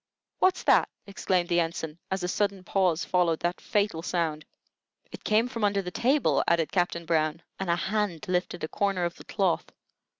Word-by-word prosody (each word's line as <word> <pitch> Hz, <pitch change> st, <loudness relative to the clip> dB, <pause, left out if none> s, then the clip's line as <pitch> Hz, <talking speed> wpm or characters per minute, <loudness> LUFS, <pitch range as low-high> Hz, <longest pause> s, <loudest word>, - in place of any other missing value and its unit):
"What's 370 Hz, 0 st, +3 dB
that?" -, -, +4 dB, 0.2 s
exclaimed 185 Hz, -3 st, 0 dB
the 175 Hz, -1 st, +2 dB
Ensign, 165 Hz, -1 st, -3 dB
as 190 Hz, -1 st, -2 dB
a -, -, 0 dB
sudden 200 Hz, 0 st, -1 dB
pause 180 Hz, -3 st, +1 dB
followed 175 Hz, -3 st, +2 dB
that 175 Hz, +1 st, -1 dB
fatal 205 Hz, -6 st, 0 dB
sound. 165 Hz, -3 st, -2 dB, 0.7 s
"It -, -, -10 dB
came 220 Hz, +3 st, +3 dB
from 230 Hz, -3 st, -5 dB
under 200 Hz, -1 st, +2 dB
the 180 Hz, -, -5 dB
table," 265 Hz, +8 st, +2 dB
added 165 Hz, -2 st, +2 dB
Captain 175 Hz, -2 st, 0 dB
Brown, 160 Hz, 0 st, 0 dB, 0.2 s
and 195 Hz, -2 st, -3 dB
a 170 Hz, -, +4 dB
hand 190 Hz, -2 st, -2 dB
lifted 180 Hz, -1 st, -1 dB
a -, -, 0 dB
corner 195 Hz, 0 st, 0 dB
of 170 Hz, -, -2 dB
the -, -, -13 dB
cloth. 190 Hz, -5 st, 0 dB
180 Hz, 180 wpm, -27 LUFS, 170-200 Hz, 0.7 s, that